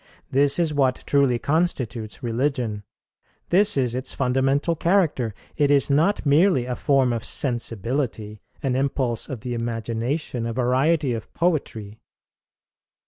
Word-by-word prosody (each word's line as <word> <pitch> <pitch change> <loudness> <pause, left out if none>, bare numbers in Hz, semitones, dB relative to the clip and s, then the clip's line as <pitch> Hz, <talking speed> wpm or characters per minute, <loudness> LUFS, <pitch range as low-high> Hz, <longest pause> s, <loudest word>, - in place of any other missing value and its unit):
This 140 +1 +3
is 165 -3 +1
what 135 -3 +1
truly 140 -4 +3
constitutes 125 -7 -2
religion; 120 -3 -1 0.7
this 200 0 +4
is 125 -3 +1
its 130 +1 -4
fundamental 135 +5 +1
character; 155 - +1 0.2
it 145 -1 +3
is 140 0 +3
not 160 +6 +2
merely 145 -2 +3
a 125 0 -3
form 135 -4 +2
of 115 -2 -3
sensibility, 115 -3 -2 0.2
an 130 -2 0
impulse 130 -3 -1
of 125 -5 -6
the 125 +1 -4
imagination, 115 +2 -3
a 115 - -3
variety 130 +3 +1
of 110 -2 -6
poetry. 115 - -2
130 Hz, 130 wpm, -23 LUFS, 115-145 Hz, 0.7 s, this